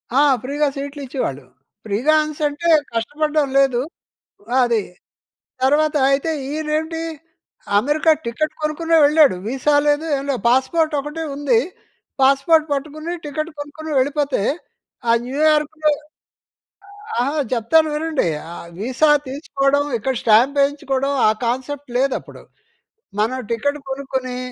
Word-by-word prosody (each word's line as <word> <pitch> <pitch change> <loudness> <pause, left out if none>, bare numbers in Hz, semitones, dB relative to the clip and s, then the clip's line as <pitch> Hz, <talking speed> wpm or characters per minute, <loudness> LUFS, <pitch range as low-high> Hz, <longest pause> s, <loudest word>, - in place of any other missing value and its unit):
ఆ! - - +5 0.2
ఫ్రీగా 290 +3 0
సీట్లు 285 +1 -6
ఇచ్చేవాళ్ళు. 145 - -4 0.4
ఫ్రీగా 225 +9 +1
అనేసంటే 305 +1 -2 0.3
కష్టపడడం 295 +6 0
లేదు. 270 -3 +3 0.8
అది. 235 -3 +2 0.8
తర్వాత 300 +3 +3
అయితే 280 +4 +1 0.2
ఈయన 310 +1 -4
ఏంటి 320 +1 -4 0.8
అమెరికా 300 +7 +3
టికెట్ 305 +7 -2
కొనుక్కునే 325 +2 +1
వెళ్ళాడు. 290 - +5
విసా 270 +3 +1
లేదు, 295 +2 +2
ఏం 275 - -5
లేదు, 260 - -1
పాస్‌పోర్ట్ 300 +6 +2
ఒకటే 300 +3 -5
ఉంది. 265 -6 +2 0.6
పాస్‌పోర్ట్ 275 +4 +4
పట్టుకుని 310 +4 -4
టికెట్ 310 +3 -4
కొనుక్కొని 300 +2 -7
వెళ్ళిపోతే, 280 -3 0 0.7
ఆ 230 - +5
న్యూయార్క్‌లో 305 +2 +2 1.3
అహా! 280 +5 0 0.2
చెప్తాను 255 +7 +3
వినండి. 310 - 0 0.5
విసా 260 +7 +2 0.2
తీసుకోవడం, 275 0 0
ఇక్కడ 265 +4 -2
స్టాంప్ 240 +6 +4
వేయించుకోవడం, 275 -1 0 0.2
ఆ - - +5 0.2
కాన్సెప్ట్ 260 +3 -3
లేదప్పుడు. 270 0 -2 0.8
మనం 230 +5 +1
టికెట్ 285 +6 -1
కొనుక్కొని 265 -2 -4
285 Hz, 110 wpm, -20 LUFS, 260-305 Hz, 1.3 s, ఆ